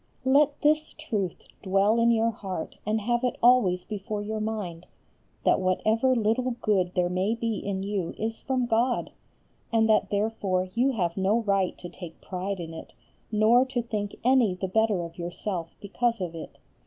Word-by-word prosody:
Let 285 +2 +4
this 305 +1 +2
truth 215 - -4
dwell 195 +4 +2
in 230 0 +4
your 230 0 +3
heart 190 -6 -6
and 215 +1 +1
have 240 +3 0
it 250 - 0
always 230 -8 +4
before 210 0 -4
your 215 +1 -3
mind 205 -6 -4 0.6
that - - +4
whatever 220 +7 +2
little 235 +2 +1
good 185 -4 +1
there 180 -1 +2
may 185 +5 0
be 230 -2 -2
in 195 -1 -3
you 195 -4 -3
is 225 +1 -3
from 255 -1 0
God, 240 +2 +1 0.6
and 225 -1 +3
that 215 - +3
therefore 200 -3 0
you 255 +4 +2
have 175 -6 -1
no 200 +5 +2
right 195 -4 0
to 175 - -8
take 175 -1 -10
pride 190 +1 -4
in 165 -1 -6
it, 160 - -10 0.4
nor 220 +4 +5
to 255 -2 -2
think 210 -3 -4
any 245 -6 +4
the 190 +1 -3
better 210 -2 +1
of 170 +1 -9
yourself 175 0 -4
because 230 +3 -1
of 180 -3 -4
it. 165 - -9
215 Hz, 175 wpm, -27 LUFS, 185-235 Hz, 0.6 s, nor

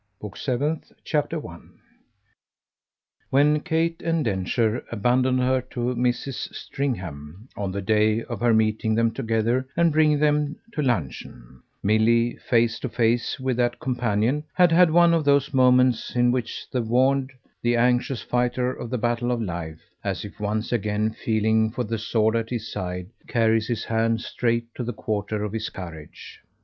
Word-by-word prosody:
Book 105 -2 -8
Seventh, 145 +4 -2
Chapter 150 +1 -1
1 85 - -12 1.5
When 145 +3 +4
Kate 165 0 -1
and 165 -3 0
Densher 110 +3 0
abandoned 125 +3 +2
her 130 0 +2
to 120 0 -2
Mrs. 125 +2 -2
Stringham 95 - -5
on 100 -2 -3
the 100 +1 -4
day 110 +2 +2
of 120 -5 -6
her 120 0 +3
meeting 110 0 +2
them 115 0 +2
together 115 +3 0
and 170 -1 +4
bringing 150 -1 +4
them 150 0 +1 0.2
to 150 - -1
luncheon, 65 - -3 0.2
Milly, 115 +3 +3
face 115 -1 +1
to 130 - -4
face 115 +3 0
with 130 -2 -1
that 120 -1 0
companion, 120 +2 0
had 180 -2 +5
had 175 +1 +6
one 170 +1 +5
of 165 -2 +2
those 140 0 +2
moments 125 -2 +3
in 120 0 +4
which 125 -2 -3
the 125 - 0
warned, 130 +4 +2 0.3
the 120 0 +2
anxious 125 +1 +1
fighter 125 +1 0
of 120 - -7
the 125 - -1
battle 120 +1 0
of 120 - 0
life, 85 -6 -5 0.2
as - - -3
if - - -11
once 105 +1 -2
again 105 -1 0
feeling 110 0 +1
for 125 +3 -3
the 115 0 -3
sword 110 0 +1
at 115 0 -1
his 115 -3 -4
side, 90 +1 -5 0.2
carries 115 -1 +2
his 120 -3 -2
hand 115 0 +1
straight 115 -1 -2
to 125 - -5
the 120 +1 -3
quarter 105 -1 -3
of 105 0 -4
his 110 -1 -3
courage. 80 -5 -10
120 Hz, 160 wpm, -24 LUFS, 110-130 Hz, 1.5 s, had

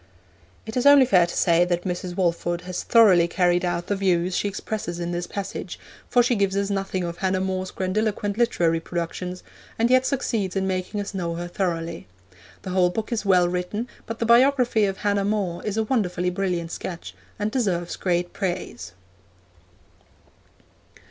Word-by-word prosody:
It 220 - -7
is 250 +2 +3
only 285 -2 +8
fair 180 -8 +4
to - - -6
say 170 0 +4
that 175 0 -1
Mrs. 180 -1 -4
Walford 175 -1 0
has 180 0 -5
thoroughly 195 -7 +5
carried 175 0 +2
out 175 -1 -1
the 205 - -1
views 180 -2 +1
she - - 0
expresses 195 -3 -4
in 170 0 -3
this 175 0 -3
passage, 200 -1 -5 0.3
for 245 - +4
she 245 - +2
gives 200 -3 +1
us 200 0 0
nothing 195 -2 -2
of 170 0 -5
Hannah 190 -1 0
More's 185 0 -2
grandiloquent 205 +1 -1
literary 175 -8 +2
productions, 175 +2 -5 0.3
and 230 +2 +2
yet 255 0 +4
succeeds 220 -8 -1
in 190 0 0
making 190 +2 -2
us 205 0 -4
know 170 -3 -3
her 175 +1 -4
thoroughly. 170 - -3 0.6
The 185 - -5
whole 180 -1 +3
book 220 +6 -4
is 225 -3 -2
well 180 -2 +5
written, 180 +6 -3 0.2
but 225 - -5
the 230 - -1
biography 240 -2 +4
of 195 -1 -2
Hannah 200 -1 0
More 195 -4 -1
is 210 0 -3
a 220 - +2
wonderfully 180 -7 0
brilliant 180 -3 -2
sketch, 175 -2 -6 0.2
and 210 +1 -2
deserves 185 -9 -1
great 175 -1 -1
praise. 175 - -4
185 Hz, 175 wpm, -24 LUFS, 175-210 Hz, 0.6 s, only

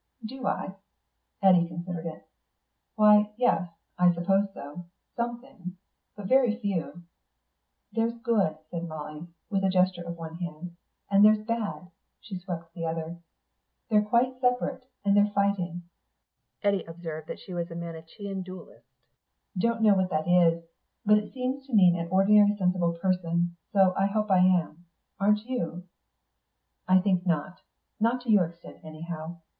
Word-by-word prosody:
"Do 260 +3 -5
I?" 190 - -2 0.7
Eddy 180 -3 +6
considered 170 0 -5
it. 160 - -9 0.7
"Why, 210 0 +5
yes, 245 -7 +2 0.3
I 180 0 +6
suppose 195 +4 +1
so; 150 0 -9 0.3
some 235 0 -2
things. 205 -9 -10 0.4
But 205 - -8
very 250 0 +3
few." 185 -5 -3 0.9
"There's 230 +2 -1
good," 210 -10 +1
said 170 0 -4
Molly, 155 +1 -7 0.2
with 195 -1 0
a 190 - +3
gesture 185 -1 +2
of 170 0 -6
one 165 0 -7
hand, 170 0 -7 0.4
"and 200 +1 +6
there's 215 0 +5
bad...." 200 -7 -3 0.3
she 190 -4 -7
swept 170 -2 -7
the 170 - -6
other. 165 +1 -4 0.7
"They're 210 -1 +5
quite 240 +4 +1
separate, 250 0 0 0.2
and 200 0 +4
they're 205 0 +4
fighting." 185 -4 0 0.8
Eddy 200 -2 +2
observed 165 -2 -7
that - - -6
she 185 - -10
was 170 -1 -3
a 165 - -8
Manichean 170 +4 -6
Dualist. 185 0 -11 0.7
"Don't 225 +4 0
know 210 -2 +7
what 190 -1 +1
that 155 -1 -1
is. 170 -2 +4 0.4
But 210 0 +6
it 210 - -9
seems 265 +1 -4
to 260 - -2
mean 180 -4 +6
an 170 0 -4
ordinary 205 +2 +5
sensible 180 -3 +1
person, 175 -1 0 0.2
so 190 -2 +4
I 195 - +2
hope 210 0 -1
I 185 - +5
am. 175 -2 +2 0.3
Aren't 210 +2 +2
you?" 180 -9 -3 1.0
"I 185 0 +6
think 185 -2 +1
not. 175 +1 -2 0.4
Not 235 +3 +1
to 245 -2 -1
your 195 -5 +5
extent, 170 +1 -14
anyhow. 160 +1 -7
185 Hz, 150 wpm, -27 LUFS, 170-210 Hz, 1.0 s, know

